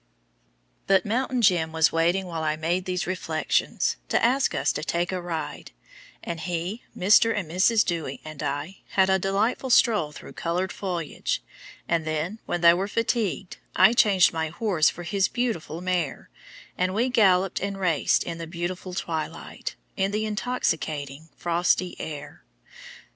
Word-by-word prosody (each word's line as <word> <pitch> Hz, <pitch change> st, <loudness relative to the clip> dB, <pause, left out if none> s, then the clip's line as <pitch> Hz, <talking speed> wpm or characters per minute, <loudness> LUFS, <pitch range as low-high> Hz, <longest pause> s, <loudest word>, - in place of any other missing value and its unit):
But 195 Hz, -2 st, +4 dB
"Mountain 250 Hz, +3 st, 0 dB
Jim" 175 Hz, -5 st, +3 dB
was 160 Hz, -1 st, +3 dB
waiting 170 Hz, +4 st, +1 dB
while 165 Hz, -3 st, -4 dB
I 155 Hz, -1 st, 0 dB
made 170 Hz, +4 st, -1 dB
these 180 Hz, -1 st, -2 dB
reflections 185 Hz, 0 st, 0 dB
to -, -, +3 dB
ask 260 Hz, +3 st, +2 dB
us -, -, +1 dB
to -, -, -4 dB
take 170 Hz, +3 st, -1 dB
a 185 Hz, -1 st, -2 dB
ride; 170 Hz, -2 st, -5 dB, 0.5 s
and 170 Hz, -1 st, -4 dB
he, 175 Hz, +6 st, -3 dB, 0.2 s
Mr. 215 Hz, +4 st, +5 dB
and 190 Hz, -5 st, -2 dB
Mrs. 195 Hz, +7 st, +3 dB
Dewy, 165 Hz, -6 st, -3 dB
and 155 Hz, -2 st, -8 dB
I, 145 Hz, +6 st, -3 dB, 0.2 s
had 190 Hz, 0 st, +4 dB
a 190 Hz, -, +3 dB
delightful 205 Hz, +7 st, 0 dB
stroll 215 Hz, -10 st, +4 dB
through 150 Hz, -, -11 dB
colored 180 Hz, +2 st, -2 dB
foliage, 175 Hz, -6 st, -3 dB, 0.4 s
and 165 Hz, -1 st, +1 dB
then, 155 Hz, +7 st, -2 dB
when 175 Hz, -, -1 dB
they 170 Hz, 0 st, +8 dB
were 190 Hz, +3 st, -1 dB
fatigued, 215 Hz, -3 st, -1 dB, 0.2 s
I 190 Hz, +5 st, +6 dB
changed 205 Hz, -9 st, +5 dB
my 160 Hz, -1 st, -1 dB
horse 170 Hz, -2 st, +2 dB
for 175 Hz, -, -8 dB
his 190 Hz, +3 st, +1 dB
beautiful 195 Hz, -10 st, -3 dB
mare, 180 Hz, -6 st, -2 dB, 0.4 s
and 185 Hz, +1 st, 0 dB
we 240 Hz, +4 st, +2 dB
galloped 195 Hz, -6 st, +3 dB
and 200 Hz, 0 st, -3 dB
raced 170 Hz, -6 st, +2 dB
in 170 Hz, -1 st, -5 dB
the 165 Hz, -, -5 dB
beautiful 180 Hz, +2 st, -5 dB
twilight, 160 Hz, -4 st, -4 dB, 0.2 s
in 195 Hz, 0 st, +1 dB
the 210 Hz, +2 st, -1 dB
intoxicating 160 Hz, -, -2 dB
frosty 175 Hz, +1 st, +1 dB
air. 150 Hz, -2 st, -7 dB
180 Hz, 155 wpm, -25 LUFS, 165-200 Hz, 0.5 s, they